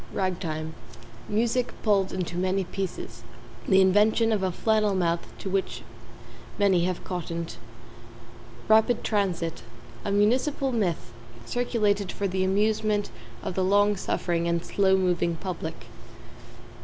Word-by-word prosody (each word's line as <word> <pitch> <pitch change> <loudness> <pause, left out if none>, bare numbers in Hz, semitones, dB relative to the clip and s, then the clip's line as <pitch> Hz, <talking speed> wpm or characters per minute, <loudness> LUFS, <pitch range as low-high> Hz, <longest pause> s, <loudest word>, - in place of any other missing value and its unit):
=RAG 185 -2 -1
TIME= 155 -2 -4 0.6
Music 235 +3 0
pulled 200 -3 +2
into 180 -2 -3
many 185 +2 0
pieces 195 - -5 0.5
the 190 0 +6
invention 210 +4 +4
of 210 -3 +1
a 190 -1 0
flannel 215 +1 +1
mouth 170 -2 0
to - - -7
which 190 0 -2 0.7
many 190 -4 +3
have 180 -1 -2
cottoned. 170 -2 -4 1.1
=RAPID 220 +2 +4
TRANSIT= 185 -6 -1 0.4
A 200 - -2
municipal 255 +7 +2
myth, 200 -9 -1 0.3
circulated 210 - 0
for 200 - -2
the 190 0 -1
amusement 210 +1 +1 0.3
of - - -3
the 185 - 0
long 205 +2 +4
suffering 170 -2 -1
and 170 0 0
slow 190 -1 +3
moving 175 -2 +1
public. 165 -2 -6
195 Hz, 125 wpm, -26 LUFS, 180-210 Hz, 1.1 s, the